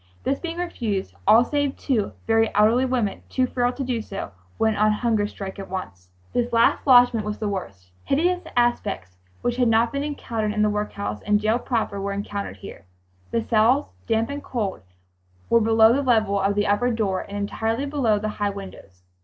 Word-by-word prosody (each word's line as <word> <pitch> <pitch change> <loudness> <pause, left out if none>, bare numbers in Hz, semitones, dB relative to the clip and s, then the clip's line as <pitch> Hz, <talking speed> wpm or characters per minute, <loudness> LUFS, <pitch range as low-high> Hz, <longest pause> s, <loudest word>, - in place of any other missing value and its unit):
This 275 - 0
being 335 -1 -5
refused, 230 - -3
all 225 +4 +7
save 285 0 -1
two 235 -8 -1
very 225 0 +3
elderly 220 +5 +4
women, 245 -6 -1
too 255 - +1
frail 245 -1 0
to 275 - -4
do 245 -3 -2
so, 195 - -6 0.3
went 220 -1 +2
on 215 0 +4
hunger 210 -1 +1
strike 195 -1 -8
at 195 - -7
once. 100 - -7 0.2
This 240 0 0
last 230 +4 +3
lodgment 245 -3 +6
was 210 0 -4
the 215 - -3
worst. 100 - -6
Hideous 355 +6 +1 0.2
aspects 95 - 0 0.3
which 245 0 0
had 250 -2 +3
not 230 +2 +3
been 280 0 -1
encountered 230 -7 -3
in 210 0 +1
the 210 - +2
workhouse 105 - -3
and 210 0 +2
jail 215 +3 +1
proper 225 -5 -2
were 200 0 -2
encountered 200 - -5
here. 95 - -11 0.4
The 230 - -1
cells, 235 +6 +2
damp 225 +1 +1
and 285 0 -5
cold, 210 -6 -3 0.7
were 230 - +5
below 225 +1 +5
the 280 - +1
level 220 -6 +2
of 200 +1 +1
the 205 0 +1
upper 205 +5 +2
door 210 -5 0
and 200 - -7
entirely 225 +5 -2
below 270 -7 +1
the 215 +1 -2
high 205 - +2
windows. 190 - -10
220 Hz, 190 wpm, -23 LUFS, 200-245 Hz, 0.7 s, all